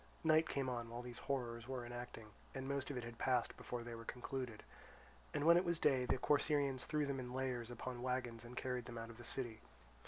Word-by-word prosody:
Night 160 Hz, 0 st, +5 dB
came 135 Hz, -2 st, 0 dB
on 120 Hz, -2 st, -2 dB
while 120 Hz, +1 st, -4 dB
these 120 Hz, -1 st, -6 dB
horrors 120 Hz, -3 st, -2 dB
were 130 Hz, -2 st, -2 dB
enacting, 120 Hz, -2 st, -6 dB, 0.2 s
and 135 Hz, 0 st, -3 dB
most 140 Hz, 0 st, 0 dB
of 140 Hz, -, -2 dB
it 125 Hz, -, -2 dB
had 115 Hz, 0 st, -7 dB
passed 125 Hz, -2 st, +2 dB
before 120 Hz, -1 st, -4 dB
they 120 Hz, 0 st, -5 dB
were 115 Hz, 0 st, -6 dB
concluded. 125 Hz, -1 st, -4 dB, 0.7 s
When 160 Hz, +4 st, +6 dB
it 175 Hz, -, +5 dB
was 170 Hz, -2 st, +2 dB
day 135 Hz, -5 st, +4 dB
the 125 Hz, -, +2 dB
Corcyraeans 145 Hz, -2 st, +3 dB
threw 150 Hz, -1 st, +2 dB
them 140 Hz, -1 st, -1 dB
in 125 Hz, 0 st, -4 dB
layers 125 Hz, -3 st, -1 dB
upon 120 Hz, +1 st, -4 dB
wagons 125 Hz, -2 st, -1 dB
and 120 Hz, +1 st, -9 dB
carried 125 Hz, -2 st, -1 dB
them 120 Hz, -1 st, -6 dB
out 115 Hz, 0 st, -5 dB
of 115 Hz, -, -13 dB
the -, -, -8 dB
city. 120 Hz, -3 st, -2 dB
125 Hz, 220 wpm, -40 LUFS, 120-135 Hz, 0.7 s, When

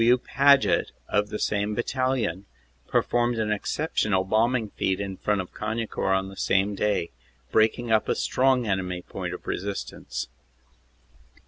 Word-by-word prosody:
W. 120 Hz, +2 st, +6 dB
Paget, 140 Hz, +2 st, +3 dB, 0.2 s
of 105 Hz, 0 st, +1 dB
the -, -, -3 dB
same 105 Hz, 0 st, 0 dB
battalion, 120 Hz, -6 st, -1 dB, 0.4 s
performed 120 Hz, 0 st, +1 dB
an 110 Hz, -1 st, 0 dB
exceptional 105 Hz, -3 st, 0 dB
bombing 110 Hz, +3 st, +1 dB
feat 95 Hz, 0 st, -1 dB
in 100 Hz, -1 st, -4 dB
front 105 Hz, 0 st, 0 dB
of 90 Hz, -, -10 dB
Cagnicourt 105 Hz, -3 st, -1 dB
on 95 Hz, 0 st, -3 dB
the 95 Hz, -, -10 dB
same 95 Hz, +2 st, +1 dB
day, 100 Hz, -4 st, 0 dB, 0.4 s
breaking 110 Hz, +2 st, +2 dB
up 110 Hz, -1 st, +3 dB
a -, -, +2 dB
strong 130 Hz, -1 st, +2 dB
enemy 90 Hz, -3 st, -2 dB
point -, -, -5 dB
of -, -, -12 dB
resistance. 100 Hz, +2 st, -4 dB
105 Hz, 140 wpm, -26 LUFS, 95-120 Hz, 0.4 s, W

